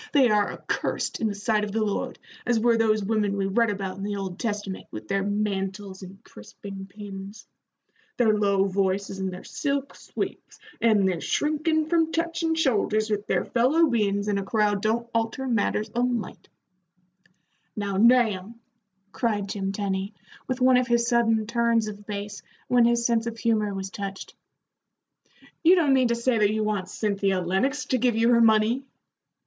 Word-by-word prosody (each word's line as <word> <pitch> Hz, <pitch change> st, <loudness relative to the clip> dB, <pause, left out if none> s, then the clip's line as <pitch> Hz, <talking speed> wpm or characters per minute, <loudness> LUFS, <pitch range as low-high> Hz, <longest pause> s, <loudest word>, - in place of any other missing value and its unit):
They 265 Hz, -6 st, +5 dB
are 210 Hz, -1 st, +2 dB
accursed -, -, -3 dB
in 225 Hz, -, +1 dB
the 205 Hz, -, -3 dB
sight 210 Hz, +1 st, 0 dB
of 205 Hz, -1 st, -4 dB
the 220 Hz, 0 st, +1 dB
Lord, 205 Hz, -2 st, -2 dB, 0.3 s
as 240 Hz, -2 st, +2 dB
were 235 Hz, +1 st, +3 dB
those 215 Hz, -2 st, +2 dB
women 205 Hz, -2 st, 0 dB
we 195 Hz, -, 0 dB
read 230 Hz, +4 st, +2 dB
about 195 Hz, -2 st, -4 dB
in 195 Hz, -, -6 dB
the 205 Hz, 0 st, -2 dB
Old 195 Hz, -2 st, -5 dB
Testament, 205 Hz, -4 st, -4 dB
with 110 Hz, 0 st, -8 dB
their 195 Hz, -, 0 dB
mantles 200 Hz, -1 st, -3 dB
and 190 Hz, +1 st, -12 dB
crisping 195 Hz, -, -10 dB
pins. 200 Hz, +1 st, -9 dB, 0.7 s
Their 220 Hz, -3 st, +3 dB
low 200 Hz, -2 st, +2 dB
voices 195 Hz, 0 st, -1 dB
and 190 Hz, -1 st, -2 dB
their 180 Hz, -, -9 dB
silk 280 Hz, -2 st, -3 dB
sweeps -, -, -6 dB, 0.2 s
and 215 Hz, -4 st, +4 dB
their 180 Hz, -3 st, -1 dB
shrinkin' 310 Hz, +1 st, 0 dB
from 325 Hz, 0 st, +1 dB
touchin' 330 Hz, 0 st, -1 dB
shoulders 215 Hz, -7 st, +1 dB
with 205 Hz, 0 st, -2 dB
their -, -, 0 dB
fellow 265 Hz, +8 st, +3 dB
beings 205 Hz, -3 st, 0 dB
in 205 Hz, -1 st, +1 dB
a -, -, -3 dB
crowd 205 Hz, 0 st, +1 dB
don't 230 Hz, +3 st, 0 dB
alter 230 Hz, +3 st, -1 dB
matters 215 Hz, -2 st, 0 dB
a 240 Hz, -, 0 dB
mite." 245 Hz, -3 st, -3 dB, 1.3 s
"Now, 200 Hz, -2 st, -2 dB
Nahum," 225 Hz, -2 st, +3 dB, 0.6 s
cried 205 Hz, -4 st, -1 dB
Jim 195 Hz, -1 st, -2 dB
Tenny, 195 Hz, 0 st, -3 dB, 0.3 s
with 255 Hz, 0 st, -2 dB
one 255 Hz, 0 st, +6 dB
of 250 Hz, 0 st, +1 dB
his 235 Hz, -1 st, +2 dB
sudden 225 Hz, -3 st, +2 dB
turns 235 Hz, -1 st, +1 dB
of 205 Hz, -1 st, -9 dB
base 205 Hz, -1 st, -5 dB, 0.3 s
when 245 Hz, -1 st, +4 dB
his 235 Hz, 0 st, +2 dB
sense 235 Hz, -1 st, +1 dB
of 230 Hz, -1 st, -5 dB
humor 220 Hz, -3 st, +1 dB
was 190 Hz, 0 st, -5 dB
touched, 195 Hz, -2 st, -6 dB, 1.3 s
"you 345 Hz, +3 st, +7 dB
don't 310 Hz, -6 st, +3 dB
mean 260 Hz, -2 st, +4 dB
to 235 Hz, -, +1 dB
say 235 Hz, 0 st, +1 dB
that 205 Hz, -1 st, +3 dB
you 215 Hz, 0 st, 0 dB
want 205 Hz, -3 st, -2 dB
Cynthia 195 Hz, -3 st, 0 dB
Lennox 190 Hz, +12 st, 0 dB
to 255 Hz, -, 0 dB
give 240 Hz, -1 st, +2 dB
you 230 Hz, +2 st, +3 dB
her 235 Hz, -1 st, +5 dB
money?" 225 Hz, +3 st, +3 dB
215 Hz, 175 wpm, -25 LUFS, 200-235 Hz, 1.3 s, you